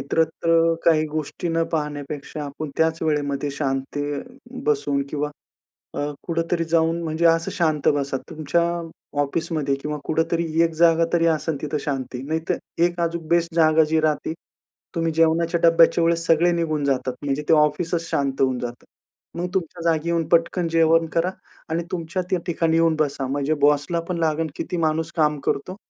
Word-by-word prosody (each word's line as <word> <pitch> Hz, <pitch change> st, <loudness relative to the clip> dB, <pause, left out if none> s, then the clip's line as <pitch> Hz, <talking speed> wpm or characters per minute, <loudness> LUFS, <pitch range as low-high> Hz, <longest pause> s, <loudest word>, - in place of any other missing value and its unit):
इतरत्र 165 Hz, +3 st, +2 dB
काही 155 Hz, -2 st, +4 dB
गोष्टी 155 Hz, +3 st, -4 dB
न 165 Hz, 0 st, +1 dB
पाहण्यापेक्षा, 150 Hz, -1 st, -4 dB
आपण 145 Hz, +1 st, -6 dB
त्याच 160 Hz, 0 st, +1 dB
वेळेमध्ये 145 Hz, -2 st, -1 dB
शांत 135 Hz, -1 st, -3 dB, 0.7 s
बसून 140 Hz, -1 st, +1 dB
किंवा 150 Hz, 0 st, -2 dB, 0.6 s
अ, -, -, -4 dB, 0.2 s
कुठेतरी 165 Hz, 0 st, -1 dB
जाऊन, 165 Hz, +1 st, +1 dB
म्हणजे 160 Hz, +1 st, -1 dB
असं 165 Hz, 0 st, +2 dB
शांत 155 Hz, -4 st, 0 dB
बसा 140 Hz, -1 st, -1 dB
तुमच्या 155 Hz, +2 st, 0 dB, 0.6 s
ऑफिसमध्ये 150 Hz, -1 st, -1 dB
किंवा 150 Hz, +2 st, -4 dB
कुठेतरी 165 Hz, 0 st, 0 dB
एक 165 Hz, -, +1 dB
जागा 165 Hz, 0 st, +4 dB
तरी 170 Hz, -1 st, +3 dB
असेल 160 Hz, -1 st, 0 dB
तिथं 150 Hz, 0 st, -2 dB
शांती. 130 Hz, -3 st, -3 dB
नाहीतर 160 Hz, +1 st, -1 dB, 0.3 s
एक 175 Hz, 0 st, +1 dB
अजून 170 Hz, -1 st, -2 dB
बेस्ट 170 Hz, 0 st, +1 dB
जागा 160 Hz, -1 st, +5 dB
जी 160 Hz, 0 st, +3 dB
राहते, 155 Hz, 0 st, 0 dB, 0.6 s
तुम्ही 165 Hz, -1 st, 0 dB
जेवणाच्या 165 Hz, +1 st, +2 dB
डब्याच्या 165 Hz, 0 st, +5 dB
वेळेस 165 Hz, 0 st, +1 dB
सगळे 165 Hz, +2 st, +4 dB
निघून 160 Hz, -3 st, -1 dB
जातात, 130 Hz, -2 st, 0 dB
म्हणजे 145 Hz, +1 st, -1 dB
ते -, -, +7 dB
ऑफिसच 155 Hz, +3 st, +2 dB
शांत 135 Hz, -1 st, -1 dB
होऊन 130 Hz, -2 st, +2 dB
जातं. 120 Hz, 0 st, -6 dB, 0.5 s
मग 180 Hz, -, -1 dB
तुमच्या 175 Hz, -2 st, -3 dB
जागी 165 Hz, +1 st, 0 dB
येऊन 165 Hz, -1 st, 0 dB
पटकन 170 Hz, +1 st, +2 dB
जेवण 165 Hz, 0 st, +4 dB
करा 170 Hz, +2 st, +2 dB, 0.4 s
आणि 165 Hz, +2 st, -1 dB
तुमच्या 170 Hz, +1 st, -2 dB
त्या 185 Hz, -, +1 dB
ठिकाणी 165 Hz, -2 st, +1 dB
येऊन 165 Hz, -1 st, +3 dB
बसा, 140 Hz, -3 st, 0 dB
म्हणजे 140 Hz, +3 st, 0 dB
बॉसला 145 Hz, +3 st, +3 dB
पण 175 Hz, -, -1 dB
लागेल 160 Hz, 0 st, 0 dB
किती 180 Hz, -, -4 dB
माणूस 160 Hz, 0 st, 0 dB
काम 150 Hz, -2 st, +2 dB
करतो 180 Hz, +7 st, -1 dB
160 Hz, 160 wpm, -23 LUFS, 150-165 Hz, 0.7 s, ते